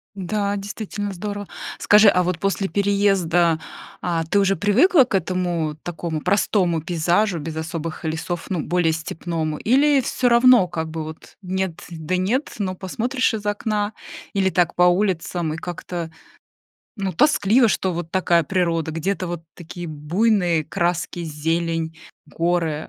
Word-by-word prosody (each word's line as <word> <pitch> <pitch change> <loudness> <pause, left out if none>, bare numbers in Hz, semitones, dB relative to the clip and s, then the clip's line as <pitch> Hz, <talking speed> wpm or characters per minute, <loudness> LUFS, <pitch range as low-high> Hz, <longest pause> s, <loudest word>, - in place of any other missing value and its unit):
Н-да, 200 +1 -1
действительно 205 0 -5
здорово. 205 +2 -5 0.3
Скажи, 210 0 +6
а 180 -1 +3
вот 180 -1 -2
после 195 0 0
переезда, 190 -5 +2 0.4
а 170 -2 -1
ты 200 +5 +2
уже 195 0 +3
привыкла 255 - +5
к 245 - -7
этому, 175 -4 -1
такому 165 -2 -4
простому 180 -3 +1
пейзажу 175 +3 +1
без 155 +1 -6
особых 165 0 -5
лесов, 160 +2 -3
ну, 180 -4 -1
более 170 0 +1
степному? 160 -1 -3
Или 275 +3 +3
всё 245 +1 0
равно 235 -4 +6
как 160 -1 -4
бы 160 0 -4
вот 155 0 -10
нет 185 -2 -3
да 170 +2 -3
нет, 230 +10 -1
но 185 -2 -1
посмотришь 240 +8 -1
из 210 -2 -4
окна 205 0 -1 0.4
или 190 -1 +2
так 175 -2 +1
по 180 - +4
улицам, 180 -3 +1
и 160 - -5
как-то, 175 -1 -5 0.9
ну, 195 -2 -2
тоскливо, 230 - +4
что 190 -2 0
вот 170 -1 -5
такая 175 -2 +2
природа: 165 -1 0
где-то 185 +4 -2
вот 175 -1 -5
такие 175 0 -8
буйные 170 +2 +1
краски, 170 +1 -2
зелень, 165 +1 -2 0.3
горы, 165 -3 -1
180 Hz, 145 wpm, -22 LUFS, 165-200 Hz, 0.9 s, Скажи